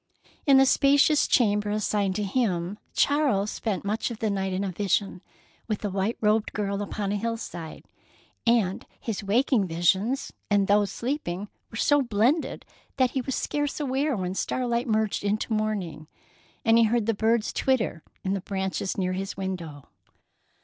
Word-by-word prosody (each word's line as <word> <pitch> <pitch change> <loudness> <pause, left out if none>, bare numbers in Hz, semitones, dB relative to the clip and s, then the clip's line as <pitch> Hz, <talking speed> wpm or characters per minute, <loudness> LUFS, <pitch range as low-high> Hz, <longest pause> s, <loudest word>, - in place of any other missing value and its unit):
In 275 -1 +7
the 270 - +7
spacious 285 +3 +4
chamber 210 -4 +2
assigned 205 -2 0
to 210 - -1
him, 200 -3 -1 0.2
Charles 275 -9 +2
spent 200 -4 -3
much 215 +5 -1
of 235 - -6
the 220 -1 -1
night 195 -1 -1
in 185 +2 -1
a 195 - -2
vision 195 0 -1 0.5
with 215 -2 -2
a 205 - -1
white 195 +4 -1
robed 215 0 +1
girl 200 -1 -2
upon 205 0 -3
a 205 - 0
hillside, 215 -7 -5 0.6
and 220 -5 +2 0.2
his 220 -3 -4
waking 215 0 +2
visions 190 +10 +1 0.2
and 205 -1 +3
those 205 0 +3
sleeping 210 - -3 0.2
were 225 - -8
so 290 +4 +4
blended 245 +6 +1 0.3
that 255 -2 +3
he 265 - -1
was 260 +1 -3
scarce 290 0 -2
aware 275 -1 0
when 185 -1 -2
starlight 240 +4 -1
merged 220 -2 0
into 210 +3 0
morning, 200 -8 -2 0.6
and 225 0 +5
he 230 - +6
heard 225 0 +1
the 225 - +2
birds 220 +1 +1
twitter 245 -10 0 0.2
in 190 - 0
the 195 - -2
branches 190 0 -3
near 185 -1 0
his 195 +1 -4
window. 170 -7 -5
210 Hz, 165 wpm, -26 LUFS, 195-235 Hz, 0.6 s, In